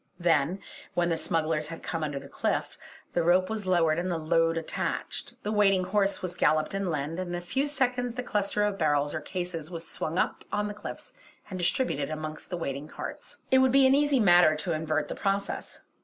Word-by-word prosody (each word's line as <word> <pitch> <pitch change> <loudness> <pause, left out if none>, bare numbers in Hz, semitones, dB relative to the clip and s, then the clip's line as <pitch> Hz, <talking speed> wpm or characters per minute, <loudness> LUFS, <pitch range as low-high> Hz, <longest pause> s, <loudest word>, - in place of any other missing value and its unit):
Then, 170 +1 +2 0.3
when 175 0 +2
the 165 - +2
smugglers 160 -2 -1
had 165 +1 -8
come 165 -2 -3
under 145 -2 -2
the 140 0 -7
cliff, - - -2 0.4
the 175 - +2
rope 180 +4 +3
was 215 -3 -3
lowered 170 -3 +3
and 180 +1 -2
the 175 - 0
load 165 +1 +2
attached; 165 - -3
the 210 - -2
waiting 195 -3 +4
horse 195 +1 0
was 180 -1 -2
galloped 155 -2 +2
inland, 165 -4 -2
and 185 -1 -3
in 175 - -2
a - - -2
few 265 +11 -1
seconds 250 -4 0
the 250 - -3
cluster 210 -2 0
of 205 -1 -2
barrels 145 -2 +2
or - - -3
cases 175 -3 -4
was 165 -2 -5
swung 160 +2 -3
up - - 0
on 210 0 0
the 205 - -4
cliff 205 - -8 0.4
and 185 - -4
distributed 175 - 0
amongst 155 0 -5
the 180 - -3
waiting 140 -3 -4
carts. - - -7
It 260 - +6
would 260 -1 +4
be 270 +1 +6
an 265 - +6
easy 290 -1 +3
matter 175 -6 +6
to 160 +3 -2
invert 155 0 -1
the - - -4
process. 200 0 -2
175 Hz, 210 wpm, -28 LUFS, 155-205 Hz, 0.4 s, It